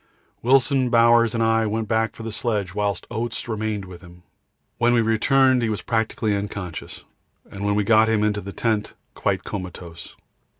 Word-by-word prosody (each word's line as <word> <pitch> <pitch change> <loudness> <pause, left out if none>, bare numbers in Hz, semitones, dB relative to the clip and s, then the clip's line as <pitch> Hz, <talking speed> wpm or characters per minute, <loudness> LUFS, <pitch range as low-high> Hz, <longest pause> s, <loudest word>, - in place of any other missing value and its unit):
Wilson, 130 +1 +3
Bowers, 115 -1 +4
and 115 - +1
I 115 0 +2
went 110 +1 -2
back 110 -1 0
for 115 - -9
the 115 - -5
sledge, 105 -5 -2
whilst 100 -2 -2
Oates 115 0 -4
remained 110 -3 -3
with 90 -2 -12
him. 90 -1 -16 0.6
When 120 +1 +3
we 120 - +4
returned 130 +3 +3
he 115 - 0
was 105 - -3
practically 110 -2 -1
unconscious, 100 -5 -6 0.5
and 100 - -7
when 100 0 +1
we 105 - +2
got 110 +1 +4
him 110 -1 +2
into 105 -1 0
the 100 - -7
tent 110 0 -1 0.2
quite - - -1
comatose. 90 -3 -8
110 Hz, 175 wpm, -23 LUFS, 100-115 Hz, 0.6 s, Bowers